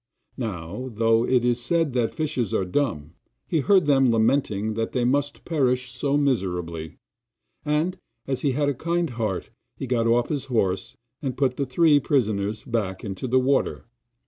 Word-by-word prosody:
Now, 105 +2 -4
though 115 +1 +2
it 125 -2 +3
is 120 0 +1
said 165 0 +1
that 120 -3 +1
fishes 135 - -2
are 95 - +1
dumb, 90 - -2 0.3
he 165 - +1
heard 185 +4 +4
them 135 -3 +4
lamenting 110 -2 +1
that 115 +1 -3
they 125 -1 +1
must 145 +3 0
perish 125 -5 0
so 140 +1 0
miserably, 90 - -1 0.7
and, 155 +5 0 0.3
as 135 -2 -2
he 140 -3 +1
had 145 +2 +1
a 145 - +2
kind 170 +2 -1
heart, 110 -5 -3 0.3
he - - -4
got 120 -2 +1
off 120 +1 +2
his 145 -3 -2
horse 100 -7 -1 0.2
and 135 -5 -3
put 130 -2 +1
the 140 0 -2
three 145 +3 +4
prisoners 110 -7 0
back 105 -6 -2
into 100 +5 -4
the 130 +2 +3
water. 135 +1 0
125 Hz, 170 wpm, -24 LUFS, 110-145 Hz, 0.7 s, heard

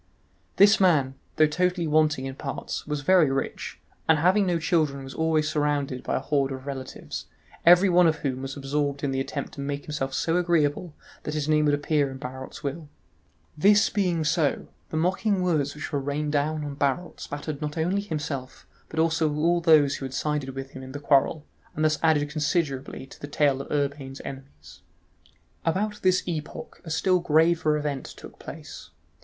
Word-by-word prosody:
This 205 +2 +6
man, 155 -9 +3 0.2
though 155 - +5
totally 180 +3 0
wanting 155 -3 +2
in 135 - -4
parts, 135 0 -5
was 150 -1 -2
very 170 -1 +5
rich, 135 0 -3 0.3
and 160 - +6
having 185 +5 +3
no 175 -1 +2
children 155 -4 0
was 135 - -8
always 160 -1 +1
surrounded 145 -4 -1
by - - -2
a - - +1
horde 140 0 0
of 130 0 -6
relatives, 135 -2 -6 0.4
every 180 +3 +8
one 180 -1 +5
of 160 - +2
whom 130 -1 -1
was 135 +1 -5
absorbed 140 +1 -2
in 140 - 0
the 135 - -1
attempt 140 +1 -4
to 140 - -7
make 140 0 -4
himself 140 -3 -3
so 165 +1 +1
agreeable 170 -2 +1 0.3
that 150 - -4
his 150 -1 -1
name 150 0 +3
would 145 -1 +3
appear 145 -1 +1
in 130 - -7
Barot's 130 +2 -8
will. 145 +2 -4 0.7
This 205 +7 +4
being 180 -6 +1
so, 155 -1 0 0.2
the 155 - -3
mocking 190 +3 +1
words 150 -6 0
which 150 - -6
were 145 - +1
rained 145 +2 -2
down 150 +1 0
on 145 - -5
Barot 145 +6 -1
spattered 145 0 -5
not 150 0 -4
only 180 +5 +1
himself 150 -8 -5 0.2
but 160 - -9
also 160 -1 +2
all 170 +4 +1
those 150 -4 +5
who 135 - -6
had 130 - -6
sided 150 -3 -2
with 135 0 -6
him 130 - -9
in 130 0 -9
the 145 - -5
quarrel, 145 +1 +2 0.3
and 155 - +1
thus 155 -1 +2
added 155 -3 +3
considerably 145 -3 -2
to 135 - -15
the 145 - -5
tale 145 -2 +1
of - - -10
Urbain's 140 -2 -2
enemies. 75 - -10 0.8
About 205 +5 -1
this 185 0 +3
epoch 155 -3 -6
a 165 - -9
still 180 +3 +2
graver 160 -1 +3
event 145 -3 -3
took - - -12
place. - - -9
150 Hz, 185 wpm, -26 LUFS, 140-165 Hz, 0.8 s, every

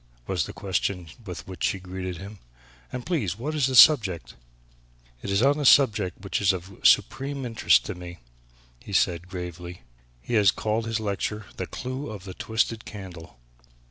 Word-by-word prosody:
was - - -1
the - - -7
question 95 -2 -2 0.2
with 90 -2 -7
which 95 -3 -7
she 100 - +1
greeted 90 -1 -6
him, 100 +3 -10 0.5
"and, 125 -1 -6
please, 115 - -1
what 145 +7 -4
is 145 -4 +2
the 130 - -1
subject?" 110 - +6 0.9
"It - - -6
is 100 +4 +2
on 145 +2 +3
a - - -1
subject 105 - +4
which 100 - -2
is 100 -1 +4
of 95 +1 -8
supreme 135 +1 +2
interest 115 -2 +3
to - - -4
me;" 90 -1 -9 0.6
he 100 - -10
said 90 -1 +1
gravely; 90 -1 -7 0.4
"he 120 - -7
has 105 -3 +5
called 110 +3 -1
his 115 0 -1
lecture 105 0 -3
'The - - -4
Clue 130 +3 -5
of 105 -4 -8
the 95 -2 -8
Twisted 110 +1 -1
Candle.' 90 - -10
100 Hz, 175 wpm, -26 LUFS, 90-120 Hz, 0.9 s, subject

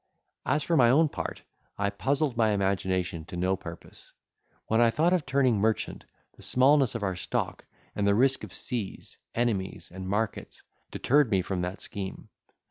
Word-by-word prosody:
As 145 +3 +2
for 170 - +1
my 120 -5 +6
own 155 +5 +5
part, - - -5 0.3
I 100 0 0
puzzled 135 +5 0
my 110 -2 +3
imagination 95 -4 -1
to 90 - -7
no 95 +2 +1
purpose. 85 -2 -11 0.5
When 110 +1 +2
I 120 - +6
thought 165 +9 +2
of 175 -7 0
turning 130 -5 +2
merchant, 110 +1 -1 0.3
the - - -17
smallness 135 -1 +4
of 115 - -3
our 95 -2 -1
stock, 90 - -3 0.3
and 100 -1 0
the 100 - +4
risk 135 +4 +3
of - - -7
seas, 115 -6 -4 0.2
enemies, 95 -8 -1
and 95 0 -6
markets, 105 +1 -3 0.3
deterred 145 -1 +2
me 95 -3 +2
from 95 -1 -2
that 90 +3 -4
scheme. 100 -4 -6
110 Hz, 170 wpm, -28 LUFS, 95-130 Hz, 0.5 s, my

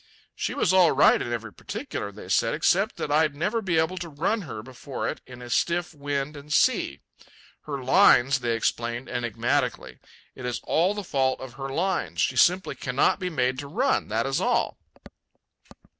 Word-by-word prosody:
She - - -3
was 185 - +2
all 180 -3 +5
right 140 - +5
in 120 - -4
every 115 -2 -4
particular, 220 - -6
they 100 -2 -11
said, 115 +5 +2
except 190 +6 +2
that 145 - -3
I'd 150 -1 +2
never 210 +10 -1
be 175 -5 0
able 160 +3 +1
to 175 -1 -6
run 165 +9 -1
her 110 -1 -6
before 130 +2 -6
it - - -4
in 125 -1 -11
a 120 - -9
stiff 175 +4 0
wind 145 0 -3
and 145 +1 -11
sea. 70 - +2 0.6
"Her 140 -3 -5
lines," 135 +1 +5
they 120 -2 0
explained 120 +2 -2
enigmatically, 120 -3 -1 0.3
"it 130 - -11
is 125 -1 -2
the 195 +5 0
fault 130 -2 +1
of 130 -2 -9
her 135 +1 -6
lines. 180 +7 -1
She - - +1
simply 185 +2 +3
cannot 130 +1 +1
be 185 - -2
made 130 -5 0
to 140 - -6
run, 255 - 0
that 110 +2 -1
is 135 0 -1
all." - - 0
140 Hz, 180 wpm, -26 LUFS, 125-170 Hz, 0.6 s, all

